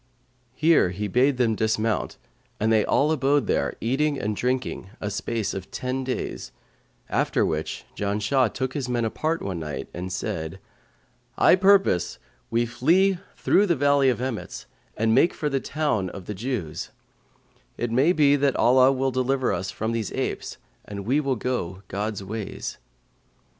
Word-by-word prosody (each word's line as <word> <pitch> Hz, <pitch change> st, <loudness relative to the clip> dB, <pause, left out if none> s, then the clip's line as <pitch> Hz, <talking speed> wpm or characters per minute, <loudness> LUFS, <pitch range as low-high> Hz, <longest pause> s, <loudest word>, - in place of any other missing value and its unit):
Here 160 Hz, -, +4 dB
he 100 Hz, +4 st, -3 dB
bade 125 Hz, +6 st, +2 dB
them 120 Hz, -3 st, +2 dB
dismount 110 Hz, 0 st, 0 dB, 0.4 s
and 110 Hz, +1 st, +2 dB
they 110 Hz, -1 st, +4 dB
all 150 Hz, +3 st, +2 dB
abode 140 Hz, -3 st, +2 dB
there, -, -, 0 dB
eating 140 Hz, +4 st, 0 dB
and 105 Hz, 0 st, -2 dB
drinking 125 Hz, -5 st, -2 dB
a 105 Hz, -, -3 dB
space 110 Hz, +1 st, -2 dB
of 95 Hz, -1 st, -6 dB
ten 130 Hz, +1 st, -3 dB
days, 130 Hz, 0 st, -4 dB, 0.6 s
after -, -, +1 dB
which 80 Hz, 0 st, -3 dB
Janshah 105 Hz, +5 st, +1 dB
took 130 Hz, -1 st, -3 dB
his 135 Hz, -4 st, -3 dB
men 120 Hz, -2 st, 0 dB
apart 155 Hz, +8 st, -1 dB
one 95 Hz, -3 st, -3 dB
night 75 Hz, -4 st, -5 dB
and 90 Hz, +2 st, -5 dB
said, 80 Hz, 0 st, -4 dB, 0.8 s
'I -, -, +6 dB
purpose 190 Hz, -, +3 dB, 0.3 s
we 120 Hz, +1 st, +1 dB
flee 170 Hz, +11 st, +2 dB, 0.2 s
through 205 Hz, +2 st, +3 dB
the 170 Hz, -, +3 dB
Valley 140 Hz, -1 st, +4 dB
of 120 Hz, -, 0 dB
Emmets 125 Hz, -4 st, -4 dB, 0.3 s
and 110 Hz, 0 st, +2 dB
make 170 Hz, -, +4 dB
for 150 Hz, -, -1 dB
the 135 Hz, -1 st, 0 dB
town 140 Hz, -11 st, -1 dB
of 95 Hz, 0 st, -9 dB
the 105 Hz, -, -4 dB
Jews; 105 Hz, -, -4 dB, 0.9 s
it 120 Hz, -1 st, -2 dB
may 135 Hz, +8 st, +4 dB
be 145 Hz, -5 st, +4 dB, 0.2 s
Allah 130 Hz, +2 st, +5 dB
will 135 Hz, 0 st, 0 dB
deliver 130 Hz, -1 st, +1 dB
us 95 Hz, +1 st, -3 dB
from 110 Hz, +3 st, -3 dB
these 115 Hz, -3 st, -2 dB
apes -, -, -3 dB, 0.3 s
and 100 Hz, -1 st, -7 dB
we 135 Hz, +6 st, +2 dB
will 135 Hz, -3 st, 0 dB
go 100 Hz, -6 st, -3 dB
God's 100 Hz, 0 st, -3 dB
ways.' 105 Hz, +1 st, -5 dB
120 Hz, 160 wpm, -25 LUFS, 105-135 Hz, 0.9 s, I